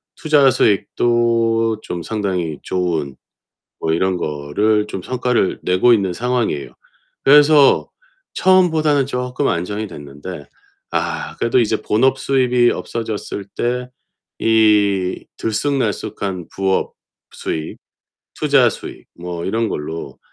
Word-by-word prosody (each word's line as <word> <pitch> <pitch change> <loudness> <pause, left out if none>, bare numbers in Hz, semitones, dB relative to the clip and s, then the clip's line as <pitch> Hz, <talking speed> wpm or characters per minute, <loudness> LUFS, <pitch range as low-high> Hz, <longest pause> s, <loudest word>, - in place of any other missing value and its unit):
투자 150 -3 +4
수익도 115 +1 +1
좀 85 - -5
상당히 90 -5 -2
좋은 80 -7 -2 0.7
뭐 80 - 0
이런 95 +3 +1
거를 90 +8 0
좀 95 -3 -6
성과를 125 -3 0
내고 90 +7 +3
있는 95 -4 0
상황이에요. 120 - -1 0.5
그래서 145 0 +6 0.4
처음보다는 160 -6 +3
쪼끔 125 +1 -2
안정이 100 +5 -2
됐는데 75 +1 -9 0.4
아 - - -3
그래도 115 +2 +2
이제 110 -1 0
본업 130 +6 +2
수입이 125 -3 +2
없어졌을 110 -3 -5
때 125 +1 -2 0.5
이 105 -4 +2
들쑥날쑥한 105 - -2
부업 95 0 0 0.4
수입, 80 0 -5 0.6
투자 - - +4
수익 - - -9
뭐 85 -1 -5
이런 115 +2 0
걸로 80 +2 -6
110 Hz, 235 characters per minute, -19 LUFS, 90-125 Hz, 0.7 s, 그래서